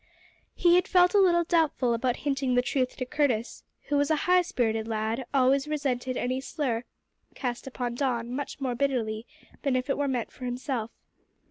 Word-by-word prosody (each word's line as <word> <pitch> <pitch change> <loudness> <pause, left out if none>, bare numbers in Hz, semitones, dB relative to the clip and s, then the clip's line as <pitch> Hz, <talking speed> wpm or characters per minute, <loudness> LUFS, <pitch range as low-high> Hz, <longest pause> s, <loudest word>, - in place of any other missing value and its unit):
He 345 -1 +4
had 360 - +1
felt 360 0 +4
a 410 - +5
little 345 -3 +4
doubtful 315 -7 +2
about 240 +1 0
hinting 270 -3 +1
the 245 - +3
truth 255 0 -1
to 255 - -2
Curtis, 255 -5 -1 0.2
who 290 - 0
was 285 0 +2
a 315 - +4
high 360 0 +5
spirited 225 -9 -1
lad 220 +1 -1
and 255 - -7
always 270 +1 +3
resented 260 -4 -1
any 255 +1 -1
slur 255 -5 -2 0.5
cast 245 -1 -4
upon 245 -2 -3
Don 240 -2 -1
much 285 +2 -4
more 260 -3 -1
bitterly 240 -4 -1 0.3
than 275 -3 +1
if 255 +2 0
it 275 - -1
were 285 - +1
meant 250 -4 -2
for 255 - -9
himself. 245 -2 -3
260 Hz, 190 wpm, -27 LUFS, 245-285 Hz, 0.5 s, a